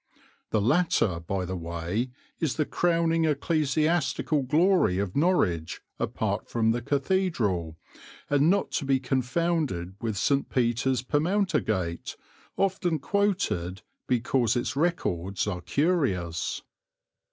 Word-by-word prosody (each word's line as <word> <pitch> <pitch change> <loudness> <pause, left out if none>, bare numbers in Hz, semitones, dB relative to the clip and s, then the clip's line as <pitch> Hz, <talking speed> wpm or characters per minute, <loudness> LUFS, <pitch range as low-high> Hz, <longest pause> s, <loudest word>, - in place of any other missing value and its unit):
(The 110 - +1
latter, 120 - +2
by 90 +2 -3
the 95 +1 -4
way, 85 +7 -3 0.3
is 150 -6 0
the 155 - +1
crowning 165 -1 +1
ecclesiastical 155 0 +1
glory 155 - +3
of 100 -1 -2
Norwich 105 - +1 0.2
apart - - -2
from 115 -1 +2
the 120 +1 -1
cathedral, 125 - 0 0.5
and 145 +2 +3
not 200 +2 +1
to 145 - -1
be 135 -1 +2
confounded 130 - -1
with 110 -4 -2
St. 140 +7 +1
Peter's 120 0 +1
Permountergate, 145 - 0 0.4
often 185 -4 +1
quoted 140 - -1 0.2
because 120 -1 +1
its 120 +2 -1
records 100 - -1
are 95 -4 -3
curious.) 115 - 0
130 Hz, 110 wpm, -27 LUFS, 95-165 Hz, 0.5 s, glory